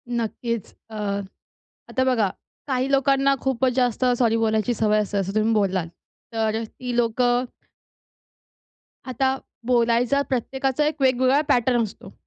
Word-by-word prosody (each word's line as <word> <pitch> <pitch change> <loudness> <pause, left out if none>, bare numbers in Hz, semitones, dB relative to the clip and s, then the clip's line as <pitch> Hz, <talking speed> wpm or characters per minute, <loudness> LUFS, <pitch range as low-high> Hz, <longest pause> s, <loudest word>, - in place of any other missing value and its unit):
नक्कीच. 230 -1 -3 0.2
अ, 220 - -10 0.9
आता 260 - 0
बघा, 235 -6 +2 0.4
काही 260 0 0
लोकांना 275 0 +3
खूपच 265 -1 +1
जास्त 250 -1 +1
सॉरी 230 -2 +2
बोलायची 220 +1 +1
सवय 215 -1 +2
असते 205 0 -3
असं 195 +1 -2
तुम्ही 215 +1 +2
बोललात. 190 -5 +1 0.5
तर 220 0 0
ती 245 +2 -6
लोकं 245 +1 +2 1.6
आता 265 +1 0 0.3
बोलायचा 240 +2 +2
प्रत्येकाचा 265 +3 -1
एक 305 -1 -2
वेगवेगळा 260 +2 +3
पॅटर्न 245 -2 +3
असतो. 210 - -9
245 Hz, 120 wpm, -23 LUFS, 220-260 Hz, 1.6 s, लोकांना